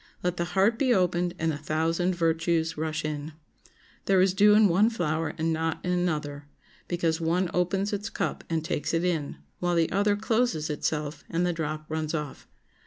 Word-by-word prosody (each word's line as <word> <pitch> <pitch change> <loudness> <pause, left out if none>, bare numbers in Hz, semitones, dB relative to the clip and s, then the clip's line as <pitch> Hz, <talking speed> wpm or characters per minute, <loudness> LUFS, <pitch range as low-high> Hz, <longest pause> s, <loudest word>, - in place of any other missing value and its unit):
Let 180 0 -1
the 170 - 0
heart 220 +5 +3
be 260 -3 +2
opened 180 -1 +1
and 165 -1 0
a 145 - -5
thousand 165 +4 0
virtues 165 -1 +1
rush 155 0 -3
in. 150 0 -4 0.7
There 195 -1 +4
is 185 0 +4
dew 210 +2 +6
in 215 -1 +6
one 195 +5 +4
flower 165 -7 -2
and 160 0 0
not 160 0 -1
in 180 - 0
another, 150 -5 -2 0.4
because 170 -2 0
one 170 +2 +1
opens 190 +3 0
its 205 +2 -3
cup - - -3
and 160 -1 -1
takes 160 0 -1
it 165 - +1
in, 160 -5 -1 0.2
while 175 0 0
the 165 -1 +2
other 205 +2 +2
closes 220 -7 0
itself 150 0 -3
and 170 +2 0
the 175 - +1
drop 155 -1 -4
runs 155 0 -2
off. 150 -3 -5
170 Hz, 185 wpm, -27 LUFS, 160-185 Hz, 0.7 s, dew